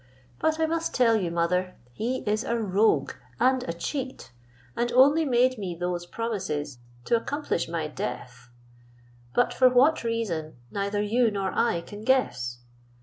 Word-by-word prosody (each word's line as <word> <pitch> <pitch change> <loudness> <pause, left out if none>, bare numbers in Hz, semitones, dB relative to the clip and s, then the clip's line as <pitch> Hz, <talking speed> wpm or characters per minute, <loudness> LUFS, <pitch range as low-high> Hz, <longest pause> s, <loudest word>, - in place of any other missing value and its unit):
But 315 0 +1
I 320 - +3
must 330 +1 -2
tell 235 -3 +4
you, 190 -6 0
mother, 180 +2 0 0.2
he 245 - -2
is 215 +2 +1
a 235 -2 -1
rogue 200 -8 +2 0.3
and 260 0 +3
a - - +1
cheat, 260 - -5 0.4
and 240 0 0
only 285 +6 +5
made 255 -2 +2
me 185 -4 -4
those 175 0 -3
promises 175 - -3 0.3
to - - +3
accomplish 280 - -2
my 165 -2 -2
death; 125 -4 -6 0.9
but 245 - +3
for 255 -1 +5
what 255 +5 +4
reason 205 -10 -2 0.2
neither 200 +1 -1
you 230 +3 +2
nor 195 -2 -2
I 175 -8 +1
can 205 +4 -10
guess. 125 - 0
215 Hz, 150 wpm, -26 LUFS, 170-255 Hz, 0.9 s, only